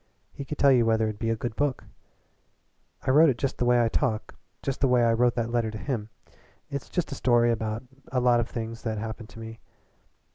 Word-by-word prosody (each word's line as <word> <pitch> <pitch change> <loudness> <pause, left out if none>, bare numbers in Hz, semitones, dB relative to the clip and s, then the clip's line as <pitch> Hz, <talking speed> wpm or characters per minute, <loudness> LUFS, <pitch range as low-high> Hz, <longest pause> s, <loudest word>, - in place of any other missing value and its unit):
He 140 - -7
could 150 +2 -5
tell 140 - +5
you 125 -3 +5
whether 110 0 +2
it'd 110 -1 -4
be 115 - -1
a 115 - +1
good 115 0 -4
book. 145 -3 -1 1.2
I - - +1
wrote 155 +3 +7
it 125 - 0
just 135 +1 -2
the 125 - +1
way 120 0 +4
I - - +3
talk, 110 -1 -1 0.3
just 135 - -3
the 135 - +4
way 125 -1 +4
I 115 -1 +4
wrote 120 +1 +2
that 115 -1 -1
letter 120 -2 +1
to 110 - -6
him. 110 -3 -3 0.6
It's 140 -1 -5
just 175 -5 -2
a - - -2
story 120 -3 +3
about 110 +1 -2 0.3
a 130 - +1
lot 125 -1 +4
of 120 - -2
things 115 0 -5
that 110 -2 -3
happened 110 +1 -6
to 115 - -12
me. 115 0 -8
120 Hz, 230 wpm, -27 LUFS, 115-130 Hz, 1.2 s, wrote